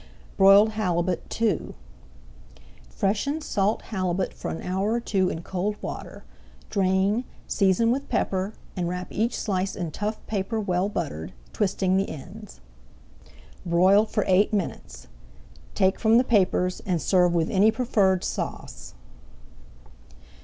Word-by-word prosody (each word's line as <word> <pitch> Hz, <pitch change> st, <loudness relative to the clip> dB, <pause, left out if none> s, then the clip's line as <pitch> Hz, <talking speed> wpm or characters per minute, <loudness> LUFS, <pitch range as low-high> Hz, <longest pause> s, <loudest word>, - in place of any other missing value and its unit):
BROILED 195 Hz, +2 st, +7 dB
HALIBUT 185 Hz, -5 st, -2 dB
II 225 Hz, -5 st, 0 dB, 1.1 s
Freshen 210 Hz, -, -1 dB
salt 210 Hz, -8 st, -1 dB
halibut 185 Hz, -3 st, -2 dB
for -, -, -6 dB
an -, -, -5 dB
hour 190 Hz, +4 st, -1 dB
or 235 Hz, -, +1 dB
two 195 Hz, -5 st, 0 dB
in 165 Hz, -, -5 dB
cold 195 Hz, +4 st, -2 dB
water, -, -, -7 dB, 0.5 s
drain, 195 Hz, +3 st, +1 dB, 0.2 s
season 200 Hz, +3 st, +2 dB
with 275 Hz, +3 st, -2 dB
pepper, 190 Hz, +2 st, -1 dB, 0.2 s
and 175 Hz, -3 st, -2 dB
wrap 180 Hz, 0 st, -5 dB
each 230 Hz, +3 st, -1 dB
slice 190 Hz, -2 st, -2 dB
in 170 Hz, -4 st, -4 dB
tough 210 Hz, +5 st, -3 dB
paper 215 Hz, +2 st, -2 dB
well 190 Hz, -1 st, 0 dB
buttered, 95 Hz, -, -4 dB, 0.2 s
twisting 190 Hz, -2 st, +1 dB
the 195 Hz, -, 0 dB
ends. 100 Hz, -, -10 dB, 1.0 s
Broil 185 Hz, +4 st, +4 dB
for 210 Hz, -1 st, 0 dB
eight 190 Hz, +2 st, +3 dB
minutes. 200 Hz, -5 st, -4 dB, 0.7 s
Take 190 Hz, -1 st, +2 dB
from 225 Hz, 0 st, +4 dB
the 245 Hz, -, +5 dB
papers 185 Hz, -5 st, +1 dB
and 180 Hz, -3 st, 0 dB
serve 180 Hz, +2 st, +2 dB
with 165 Hz, -1 st, +1 dB
any 200 Hz, +3 st, +5 dB
preferred 215 Hz, -6 st, +1 dB
sauce. -, -, -5 dB
195 Hz, 130 wpm, -25 LUFS, 180-215 Hz, 1.1 s, BROILED